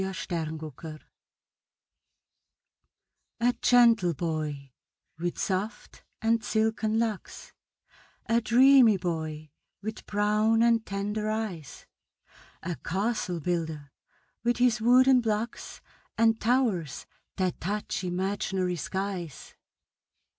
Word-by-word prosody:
THE 190 Hz, -, -1 dB
CASTLE 165 Hz, -4 st, -4 dB
BUILDER 155 Hz, +1 st, -9 dB, 2.4 s
A 245 Hz, +1 st, +3 dB
gentle 235 Hz, -8 st, +5 dB
boy, 150 Hz, -4 st, -4 dB, 0.5 s
with 175 Hz, +1 st, -3 dB
soft 195 Hz, +4 st, -3 dB, 0.2 s
and 230 Hz, 0 st, +2 dB
silken 220 Hz, 0 st, 0 dB
locks 225 Hz, -4 st, -3 dB, 0.7 s
A 230 Hz, +1 st, +2 dB
dreamy 245 Hz, -1 st, +6 dB
boy, 155 Hz, -4 st, -4 dB, 0.3 s
with 215 Hz, +1 st, -7 dB
brown 215 Hz, +2 st, +2 dB
and 230 Hz, -1 st, +3 dB
tender 210 Hz, +2 st, -3 dB
eyes, 215 Hz, -9 st, -5 dB, 0.8 s
A 170 Hz, 0 st, -4 dB
castle 195 Hz, -1 st, -2 dB
builder, 160 Hz, -4 st, -3 dB, 0.5 s
with 240 Hz, +1 st, +1 dB
his 245 Hz, -2 st, +2 dB
wooden 255 Hz, +2 st, +5 dB
blocks, 220 Hz, 0 st, -3 dB, 0.4 s
And 225 Hz, 0 st, +3 dB
towers 220 Hz, -, 0 dB, 0.3 s
that 185 Hz, -2 st, -1 dB
touch 205 Hz, +2 st, -3 dB
imaginary 185 Hz, 0 st, -1 dB
skies. 185 Hz, -4 st, -5 dB
205 Hz, 95 wpm, -28 LUFS, 170-225 Hz, 2.4 s, dreamy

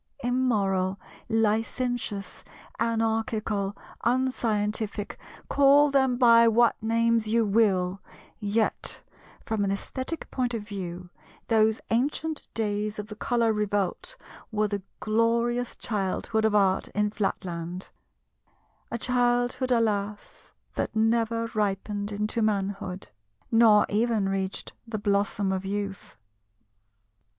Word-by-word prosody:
Immoral, 200 Hz, -7 st, +1 dB, 0.3 s
licentious, 225 Hz, -1 st, -1 dB, 0.4 s
anarchical, 220 Hz, -3 st, -1 dB, 0.3 s
unscientific—call 245 Hz, +4 st, +1 dB
them 265 Hz, -3 st, +3 dB
by 235 Hz, -2 st, +7 dB
what 230 Hz, 0 st, +4 dB
names 230 Hz, 0 st, +2 dB
you 225 Hz, +1 st, +2 dB
will—yet, 200 Hz, +1 st, -1 dB, 0.4 s
from 220 Hz, -2 st, -1 dB
an 200 Hz, -, 0 dB
aesthetic 260 Hz, +10 st, -4 dB
point 245 Hz, -2 st, -1 dB
of 220 Hz, -, -4 dB
view, 180 Hz, -4 st, -6 dB, 0.4 s
those 220 Hz, -1 st, +3 dB
ancient 295 Hz, +6 st, -1 dB
days 210 Hz, -1 st, -1 dB
of 210 Hz, +1 st, -6 dB
the 210 Hz, -, -7 dB
Colour 230 Hz, 0 st, +1 dB
Revolt 210 Hz, -, -1 dB, 0.4 s
were 215 Hz, -1 st, +1 dB
the 205 Hz, -1 st, -3 dB, 0.2 s
glorious 235 Hz, +2 st, +1 dB
childhood 215 Hz, +1 st, -1 dB
of 215 Hz, -1 st, +2 dB
Art 195 Hz, -2 st, +3 dB
in 210 Hz, 0 st, +1 dB
Flatland—a 185 Hz, +2 st, -7 dB
childhood, 245 Hz, +1 st, +1 dB
alas, 210 Hz, -3 st, -1 dB, 0.2 s
that -, -, -3 dB
never 230 Hz, +1 st, +2 dB
ripened 205 Hz, 0 st, -1 dB
into 210 Hz, +3 st, -1 dB
manhood, 195 Hz, -3 st, -2 dB, 0.4 s
nor 225 Hz, -2 st, +6 dB
even 220 Hz, -1 st, +1 dB
reached 195 Hz, 0 st, -2 dB
the 225 Hz, -1 st, -3 dB
blossom 200 Hz, -1 st, 0 dB
of 190 Hz, 0 st, -2 dB
youth. 200 Hz, -, -5 dB
215 Hz, 100 wpm, -27 LUFS, 200-235 Hz, 0.4 s, by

